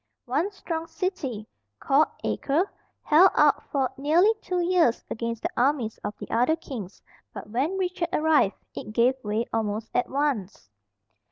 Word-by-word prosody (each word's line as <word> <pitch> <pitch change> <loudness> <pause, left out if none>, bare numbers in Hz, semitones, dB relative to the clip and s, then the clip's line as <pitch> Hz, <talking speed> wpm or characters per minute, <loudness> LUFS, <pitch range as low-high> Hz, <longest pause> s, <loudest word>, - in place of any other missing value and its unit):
One 295 +10 0
strong 330 -4 -5
city, 270 - -3 0.3
called 285 +3 +3 0.2
Acre, 315 +8 0 0.4
held 340 +5 +6
out - - +4
for 265 -3 0
nearly 330 +10 +4
two 360 -1 -2
years 345 -8 +2
against 230 0 -3
the - - 0
armies 250 -4 +1
of 210 - -5
the - - -9
other 245 +7 +3
kings, 235 - -8 0.3
but 210 - -8
when 285 - 0
Richard 360 -2 -1
arrived 305 -10 +3 0.2
it 215 - -7
gave 240 +3 +4
way 215 +2 -1
almost 220 0 -2
at 245 - 0
once. 255 - -2
275 Hz, 150 wpm, -26 LUFS, 230-330 Hz, 0.4 s, held